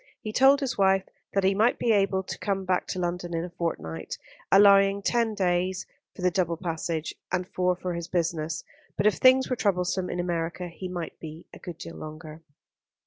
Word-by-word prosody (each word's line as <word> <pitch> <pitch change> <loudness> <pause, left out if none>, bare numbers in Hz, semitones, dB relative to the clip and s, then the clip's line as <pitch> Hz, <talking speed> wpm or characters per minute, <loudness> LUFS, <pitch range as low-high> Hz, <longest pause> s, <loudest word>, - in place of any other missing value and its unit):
He 215 -2 -6
told 270 +3 +6
his 255 -5 -2
wife 190 -1 +4 0.3
that 195 - +2
he 190 +1 +4
might 220 +5 +3
be 235 - +1
able 195 -2 +2
to - - -6
come 195 -2 -2
back 185 0 0
to - - -4
London 175 -1 -2
in 165 - -1
a 180 - -9
fortnight, 80 - -4 0.3
allowing 195 0 +6
ten 230 -1 +1
days 185 -1 0 0.3
for 180 - -8
the 180 - +3
double 170 -3 0
passage, 165 -2 -3 0.2
and 180 0 -1
four 180 -1 0
for 180 0 -4
his 170 -1 -5
business; 165 -2 -1 0.3
but - - 0
if 210 - +4
things 260 0 +5
were 255 - -1
troublesome 185 -4 0
in 175 - -3
America 175 0 -2
he 185 +2 -7
might 175 -2 -6
be 160 +1 -9
a - - -11
good 175 -3 -8
deal 165 0 -9
longer. 155 +1 -9
180 Hz, 195 wpm, -27 LUFS, 170-195 Hz, 0.3 s, told